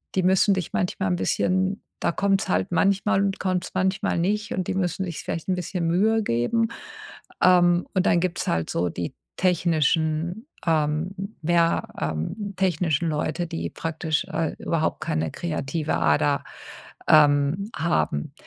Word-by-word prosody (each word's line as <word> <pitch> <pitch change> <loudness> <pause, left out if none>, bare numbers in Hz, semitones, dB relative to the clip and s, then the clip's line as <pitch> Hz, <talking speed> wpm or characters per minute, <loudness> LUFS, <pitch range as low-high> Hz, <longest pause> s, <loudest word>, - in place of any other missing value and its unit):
die 185 - +2
müssen 190 +2 +4
dich 185 -4 -4
manchmal 135 - -1
'n 90 - +1
bisschen 185 - 0 0.2
da - - +1
kommt's 195 +2 +1
halt 90 +1 +1
manchmal 195 0 +2
und 195 -1 -1
kommt's 185 -1 -1
manchmal 190 -1 0
nicht 210 +5 -1
und 185 -2 -2
die - - -1
müssen 190 0 -1
sich 170 -4 -5
vielleicht 165 - -4
'n 185 - +2
bisschen 180 -1 -2
Mühe 215 +6 +3
geben. 205 - +1 0.8
Ähm, 175 -1 +5
und 185 -1 +1
dann 170 - +4
gibt's 180 0 -2
halt 80 -1 0
so 90 +1 0
die 85 0 -5 0.2
technischen 165 +1 +1 0.2
ähm, 155 +3 +1 0.3
ja, 170 0 +2
ähm, 80 - -3
technischen 170 -3 +1
Leute, 155 +3 -2
die 165 0 -4
praktisch, 160 -1 -2
äh, - - -2
überhaupt - - -1
keine 80 +1 -1
kreative 155 - -2
Ader, 75 -3 +2 0.6
ähm, 150 +5 +4
haben. 75 - -1
170 Hz, 145 wpm, -24 LUFS, 150-185 Hz, 0.8 s, Ähm